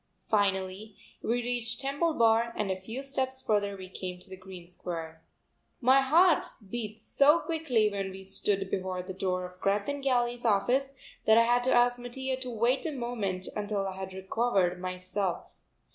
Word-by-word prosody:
Finally 195 0 0 0.3
we 240 +1 0
reached 240 -1 -2
Temple 285 +4 0
Bar 230 0 +3
and 205 -2 0
a 185 0 -3
few 230 +8 -6
steps 265 -1 -2
further 205 -5 0
we 185 -1 -8
came 185 -1 -6
to 190 +1 -10
Green 185 -2 -11
Square. 165 -2 -6 0.6
My 265 +2 +5
heart 330 +6 +4 0.2
heat 220 -2 -4
so 285 +7 +4
quickly 305 -10 +1
when 195 -1 -2
we 190 0 -9
stood 195 0 -1
before 185 -1 -2
the 190 +1 -6
door 185 -1 -1
of 180 0 -12
Greth 200 +1 +1
and 285 0 -2
Galley's 245 -2 +1
office 245 +5 +2 0.3
that 220 0 +6
I 230 - +7
had 240 +1 +3
to 260 - +2
ask 245 0 +4
Mattia 260 +2 -3
to 255 -1 -5
wait 240 +3 +1
a - - -2
moment 225 -8 -3
until 205 -1 -1
I 190 - -5
had 190 0 -6
recovered 190 -1 0
myself. 185 0 -3
215 Hz, 175 wpm, -29 LUFS, 190-245 Hz, 0.6 s, I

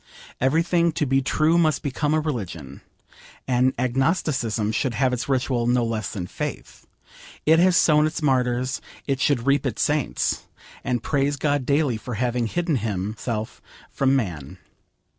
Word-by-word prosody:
Every 140 +6 +2
thing 170 -1 +2
to 150 - 0
be 135 0 +2
true 155 +5 +2
must 155 -3 +1
become 145 +2 0
a - - +3
religion. 95 - -5 0.7
And 130 +1 +2
agnosticism 130 - 0
should 120 +1 -1
have 130 +2 +1
its 125 +2 -3
ritual 125 -3 0
no 120 -1 +2
less 110 -2 -3
than 95 -5 -4
faith. - - -7 0.6
It 160 +1 +5
has 180 0 +4
sown 150 -2 +4
its 155 - -4
martyrs, 130 -2 +1 0.2
it 135 -2 -1
should 130 -5 +1
reap 140 0 +3
its 130 -6 -1
saints, 150 -2 -1 0.4
and 120 -2 -1
praise 145 0 0
God 145 -2 0
daily 140 -4 +2
for 115 +2 -6
having 120 0 0
hidden 170 +2 0
Himself 110 +1 -4 0.3
from 135 0 +2
man. 85 - -3
130 Hz, 155 wpm, -23 LUFS, 115-150 Hz, 0.7 s, It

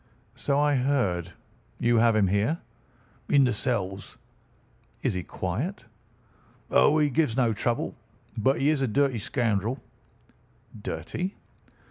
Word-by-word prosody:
"So 140 0 0
I 145 -1 +3
heard. 100 - 0 0.5
You 120 0 +3
have 115 0 +4
him 105 -2 +4
here?" 100 - +1 0.7
"In 140 -1 +5
the 125 - +2
cells." 100 -4 -3 0.9
"Is - - +1
he 90 - -2
quiet?" 115 - -4 0.9
"Oh, 145 - +5
he 150 -1 +4
gives 140 -4 +1
no 120 -4 +3
trouble. 115 +2 -1 0.4
But 130 +5 +2
he 145 +3 +3
is 150 -3 0
a 135 - +2
dirty 135 0 +1
scoundrel." 115 +1 -1 1.0
"Dirty?" 135 - -4
120 Hz, 125 wpm, -27 LUFS, 100-140 Hz, 1.0 s, In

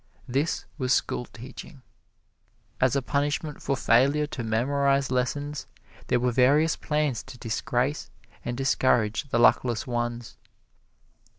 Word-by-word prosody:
This 140 +6 -1
was 130 -1 0
schoolteaching. 125 +3 -8 1.0
As 130 +1 +3
a 140 - 0
punishment 145 +2 -1
for 135 -1 -1
failure 140 +6 +3
to 145 -5 -6
memorize 135 +4 +1
lessons, 140 +2 -2 0.4
there 125 - +2
were 125 0 +1
various 140 +6 +4
plans 150 -6 -1
to 135 -1 -12
disgrace 125 +5 -2 0.3
and 120 0 -4
discourage 130 -2 +1
the 115 - +1
luckless 120 -1 +3
ones. 120 -1 -3
130 Hz, 115 wpm, -26 LUFS, 120-140 Hz, 1.0 s, various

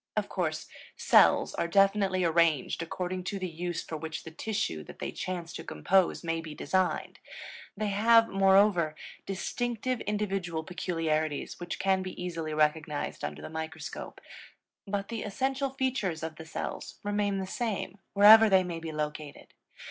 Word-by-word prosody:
Of - - 0
course, - - -2 0.3
cells - - +5
are 170 - -1
definitely 195 0 +3
arranged 165 -3 +2
according 180 +2 -4
to 200 - -3
the 185 -1 -3
use 175 0 -4
for 160 - -5
which 160 +1 -6
the 160 - -9
tissue 160 - -2
that - - -11
they - - -4
chance 175 -2 -5
to - - -6
compose 190 -1 +1
may 165 -1 -1
be 155 -2 -8
designed; 185 +3 -1 0.6
they 210 0 -1
have, 225 +3 +5
moreover, 195 -4 +4 0.3
distinctive 240 +5 -2
individual 195 -6 -2
peculiarities 160 -3 -2
which 175 0 -5
can 190 0 +2
be 185 0 -7
easily 165 -3 -4
recognized 150 -1 0
under 75 0 -5
the - - -6
microscope; 160 -1 -6 0.7
but 200 0 -3
the 230 -2 -4
essential 265 +6 -1
features 260 - -2
of 160 -1 -5
the 160 - -10
cells - - -5
remain 205 -1 0
the 190 - -2
same, 205 -1 -3 0.2
wherever 215 +2 +9
they 190 -1 +5
may 170 -2 -4
be 165 -1 -6
located. 150 -1 -5
185 Hz, 155 wpm, -29 LUFS, 160-205 Hz, 0.7 s, wherever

